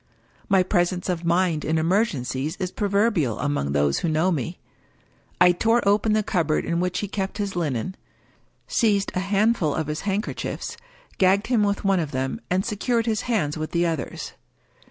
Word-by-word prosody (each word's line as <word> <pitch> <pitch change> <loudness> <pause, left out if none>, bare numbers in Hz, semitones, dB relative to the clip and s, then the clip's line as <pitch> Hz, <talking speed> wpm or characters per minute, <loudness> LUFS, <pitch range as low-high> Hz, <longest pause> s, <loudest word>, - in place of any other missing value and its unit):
My 190 -2 +5
presence 180 -1 0
of 175 -2 -1
mind 170 -2 +1
in 160 +1 0
emergencies 160 - 0
is 185 -1 -3
proverbial 200 - +1
among 145 - -1
those 70 -1 +2
who 170 - -1
know 160 +4 +2
me. 165 +2 -3 0.8
I 180 0 +7
tore 225 +5 +2
open 210 +2 +3
the 215 0 +2
cupboard 175 -8 0
in 170 0 0
which 180 0 -1
he 205 - -2
kept 195 0 -3
his 200 -2 -3
linen 155 0 -2 0.4
— - - -36 0.3
seized 205 -4 +1
a - - 0
handful 195 -4 +1
of 160 - -1
his 150 +1 -4
handkerchiefs 200 +2 -3 0.2
— - - -29
gagged 190 +2 +4
him 240 -3 +2
with 200 -1 0
one 195 -2 +3
of 155 -3 -3
them, 130 - -2
and 185 +2 +1
secured 230 +2 0
his 220 -3 0
hands 155 -10 0
with 155 - -4
the 170 0 +2
others. 165 -4 -3
180 Hz, 180 wpm, -24 LUFS, 160-205 Hz, 0.8 s, I